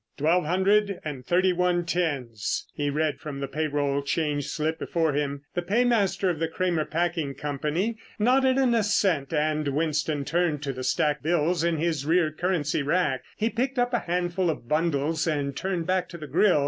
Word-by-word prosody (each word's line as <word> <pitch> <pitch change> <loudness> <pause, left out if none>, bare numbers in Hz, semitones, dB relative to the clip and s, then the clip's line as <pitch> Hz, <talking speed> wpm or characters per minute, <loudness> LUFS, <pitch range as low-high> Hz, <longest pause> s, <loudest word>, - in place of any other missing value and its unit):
"Twelve 165 +4 +2
hundred 195 +3 +2
and 140 -4 -5
thirty 180 +6 +2
one 175 -1 +1
tens," 140 - -1
he 145 -1 -1
read 150 +1 0
from 145 -3 -6
the 140 - -3
payroll 145 -1 -1
change 145 -1 -1
slip 160 +1 -2
before 160 -3 0
him. 140 -1 -2
The 175 - -1
paymaster 205 0 +2
of 170 -4 0
the 165 - 0
Cramer 170 -1 0
Packing 165 -4 -1
Company 150 - -2 0.2
nodded 260 +4 +3
an 260 -3 +3
assent 195 -9 +1
and 155 -1 0
Winston 150 0 0
turned 165 -3 0
to 135 -2 -2
the 130 0 -6
stacked 145 +3 +1
bills 165 +1 +1
in 170 -1 +1
his 160 -3 0
rear 160 +1 +2
currency 155 -3 0
rack. 145 -3 +1 0.2
He 220 +2 0
picked 260 +3 -1
up 245 0 +1
a 240 - +3
handful 175 0 -1
of 145 -6 -4
bundles 155 +1 0
and 140 -3 -1
turned 180 -1 -2
back 185 0 0
to 170 - -8
the 155 - -7
grill. 175 +4 +3
160 Hz, 180 wpm, -26 LUFS, 145-180 Hz, 0.2 s, nodded